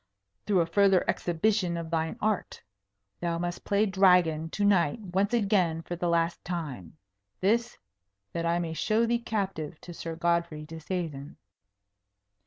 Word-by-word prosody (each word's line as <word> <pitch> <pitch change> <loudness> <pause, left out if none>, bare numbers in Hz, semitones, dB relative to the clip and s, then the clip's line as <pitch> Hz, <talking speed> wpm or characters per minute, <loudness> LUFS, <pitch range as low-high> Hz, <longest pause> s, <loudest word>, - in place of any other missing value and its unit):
"Through 195 -4 +4
a - - +2
further 195 +2 +3
exhibition 175 0 +1
of 165 -1 -6
thine 165 +5 -1
art. 215 -2 -2 0.6
Thou 170 -1 -1
must 175 0 -4
play 205 +1 +2
Dragon 180 -5 +3
to 205 +4 -1
night 185 -2 +3
once 195 +1 -1
again 195 -8 +1
for 175 - -5
the 175 0 -1
last 170 0 +1
time. 150 - -5 0.4
This, 235 +5 +1 0.6
that 170 - -2
I 170 0 +1
may 170 -2 -2
show 215 +7 +1
thee 235 +1 +1
captive 190 -9 -3
to 175 - -9
Sir 165 0 -6
Godfrey 170 -2 0
Disseisin." 160 -3 -5
175 Hz, 145 wpm, -28 LUFS, 165-200 Hz, 0.6 s, Through